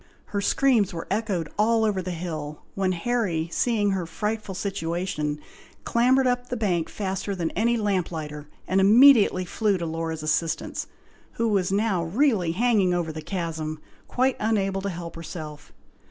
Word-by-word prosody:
Her 200 - 0
screams 215 -5 +2
were 165 - -5
echoed 200 -6 -1
all 225 +1 +3
over 200 -3 0
the 185 - -5
hill, 160 -4 -5
when 190 -1 0
Harry 180 -4 -1
seeing 210 -3 +1
her 185 -3 -2
frightful 210 +2 -3
situation, 170 -5 -2 0.4
clambered 255 +3 +3
up 245 0 0
the 245 - -2
bank 180 -7 0
faster 195 0 -3
than 170 -3 -2
any 235 +2 +1
lamplighter, 165 -8 -2 0.2
and 190 +1 +2
immediately 215 -3 +6
flew 205 +2 0
to 170 - -3
Laura's 160 -1 -3
assistance, 155 +1 -1 0.5
who 230 0 0
was 190 -3 +1
now 200 -3 +1
really 190 - +1
hanging 205 -4 +2
over 170 -2 -1
the 155 0 -6
chasm, 160 -3 -4 0.3
quite 255 +1 +1
unable 195 -3 0
to 200 - -2
help 170 -2 -7
herself. 155 -3 -8
190 Hz, 155 wpm, -25 LUFS, 165-220 Hz, 0.5 s, immediately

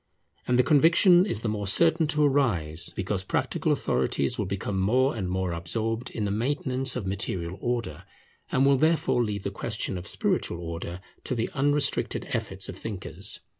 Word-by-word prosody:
And 125 - +3
the 125 - +5
conviction 170 +6 +5
is 115 - -3
the 115 - -2
more 105 -2 -2
certain 160 - +4
to 150 0 +1
arise, 90 - +2
because 95 0 -2
practical - - -1
authorities 70 - 0
will 105 - -2
become 95 0 -3
more 125 +8 +2
and 95 -5 -3
more 95 -1 -1
absorbed 110 +8 -3
in 110 - -3
the 100 - -1
maintenance 130 +3 -1
of - - -3
material 95 -2 -3
order, 120 -2 -3 0.5
and 130 +2 +3
will 140 0 +5
therefore 155 -4 +2
leave 105 -3 -3
the 100 - -3
question 100 -2 -3
of 90 - -10
spiritual 85 - -1
order 85 +1 -6 0.2
to 130 - -2
the 115 -1 -2
unrestricted 145 +1 +1
efforts - - -3
of - - -7
thinkers. 95 -4 -3
110 Hz, 170 wpm, -26 LUFS, 95-135 Hz, 0.5 s, the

